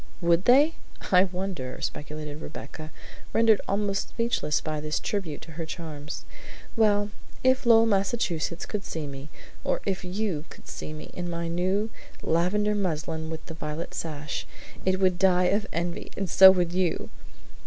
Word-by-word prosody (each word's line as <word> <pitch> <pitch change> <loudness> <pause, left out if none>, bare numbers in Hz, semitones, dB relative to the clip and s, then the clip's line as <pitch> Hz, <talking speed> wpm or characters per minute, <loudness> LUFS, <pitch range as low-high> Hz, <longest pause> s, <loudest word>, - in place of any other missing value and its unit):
"Would 170 +1 +3
they? 285 +6 +6 0.4
I 185 0 +7
wonder," 180 -8 -4
speculated 150 0 -5
Rebecca, 155 +1 -8 0.4
rendered 225 -2 +5
almost 200 0 0
speechless 230 -10 0
by 155 -1 -3
this 150 0 -1
tribute 185 -8 -3
to 165 - -10
her 165 +2 -5
charms. 155 -3 -6 0.5
"Well, 205 -2 +3 0.3
if 260 0 +3
Lowell, 225 -1 +7
Massachusetts, 195 -5 0
could 210 -2 -3
see 160 -5 -4
me, 140 +1 -8 0.3
or - - +1
if 190 -2 -1
you 180 -4 -2
could - - -14
see - - -6
me, 155 0 -8
in 175 -1 -4
my 170 0 -2
new 185 +6 0 0.3
lavender 195 +6 +2
muslin 160 -4 -2
with 160 -1 -6
the - - -7
violet 155 +1 -5
sash, 150 -2 -4 0.4
it 185 0 +2
would 185 -2 +2
die 180 -1 +4
of 210 +2 0
envy, 170 +1 -3
and 195 - -1
so 190 +3 +10
would 180 -2 +3
you!" 180 -3 0
180 Hz, 155 wpm, -27 LUFS, 160-200 Hz, 0.5 s, so